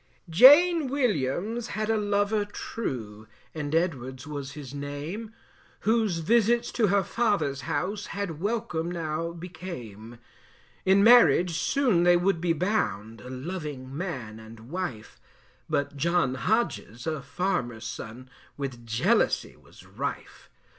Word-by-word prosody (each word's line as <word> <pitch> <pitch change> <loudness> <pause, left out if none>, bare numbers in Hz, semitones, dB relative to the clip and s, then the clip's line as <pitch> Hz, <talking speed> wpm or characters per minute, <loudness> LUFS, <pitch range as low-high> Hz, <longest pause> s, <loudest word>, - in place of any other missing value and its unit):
Jane 290 - +7
Williams 220 - -1
had 215 +1 0
a - - +2
lover 205 0 +1
true 115 - -6 0.3
And 150 -1 -3
Edwards 130 -6 -1
was 140 -3 -6
his 145 -3 -9
name, 145 +10 -5 0.5
Whose 220 -4 +2
visits 235 +5 +2
to 225 -4 +2
her 200 +1 +3
father's 190 - 0
house, 200 +2 -2
Had 195 -6 -4
welcome 205 -6 -2
now 165 -1 -3
became. 125 - -9 0.7
In 195 +1 +5
marriage 225 -7 +6
soon 245 - +2
they 175 0 +5
would 175 -1 +1
be 175 -1 +1
bound, 130 - -1
A 125 - -10
loving 140 -2 -6
man 130 - -5
and 110 +3 -13
wife, 170 -12 -5 0.5
But 140 0 -1
John 165 -3 +1
Hodges, 130 - -1
a 155 -3 -2
farmer's 125 -7 -2
son, 115 +2 -7 0.3
With 130 -4 -5
jealousy 115 0 +1
was - - -18
rife. - - -6
170 Hz, 125 wpm, -27 LUFS, 130-205 Hz, 0.7 s, Jane